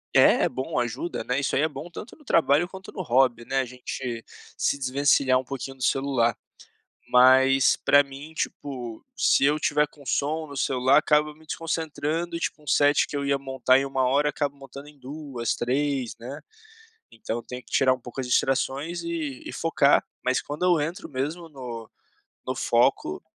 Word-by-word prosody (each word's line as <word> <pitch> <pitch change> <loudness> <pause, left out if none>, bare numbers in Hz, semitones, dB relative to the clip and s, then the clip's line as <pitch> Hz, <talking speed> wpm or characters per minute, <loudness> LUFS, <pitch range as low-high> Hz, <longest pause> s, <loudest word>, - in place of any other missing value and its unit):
é - - +6
é - - +1
bom 130 -1 -3
ajuda, 120 +8 -3
né, 125 +1 -1
isso 140 - -1
aí 135 - +2
é 155 - +3
bom 150 +4 -8
tanto 210 - -9
no 300 - -20
trabalho 160 - +3
quanto 190 0 -11
no 185 - -4
hobby, 125 -3 +2
né, 135 0 0
a 130 - 0
gente 125 -1 -6 0.3
se - - +1
desvencilhar 135 -1 +2
um - - -5
pouquinho 135 0 -6
do 130 - -7
celular, 130 -5 +1 0.7
mas 130 +1 +5
pra 145 0 +5
mim, 140 +3 -11
tipo, 125 -8 -5
se 135 - +4
eu 150 +2 +2
tiver 150 0 +2
com 145 -1 -18
som 155 +4 -1
no 140 - -10
celular 130 +1 +3
acaba 150 0 +2
me 160 +1 -20
desconcentrando 165 +1 -3
e - - -6
tipo 160 - -3
um 150 - -21
set 145 +2 +3
que 145 - -4
eu 140 - -2
ia 140 0 +2
montar 130 -1 +2
em 135 - -1
1h 135 +2 +1
acabo 145 -1 -2
montando 140 +1 -11
em 150 - -18
2, 135 -3 -4
3, 135 0 -1
né, 130 +5 -7 0.7
então 115 0 -5
eu - - -7
tenho 125 +2 -8
que - - -20
tirar 130 -1 +4
um 130 - -10
pouco 125 +2 -7
as 130 - -4
distrações 140 +7 0
e 160 -6 -4
e - - -6
focar, 165 -3 +3 0.2
mas 130 0 +1
quando 150 +5 -4
eu 175 -2 +4
entro 165 +4 -5
mesmo 150 +5 -4
no 120 -6 -8 0.6
no - - -1
foco, - - +1
140 Hz, 190 wpm, -25 LUFS, 130-150 Hz, 0.7 s, é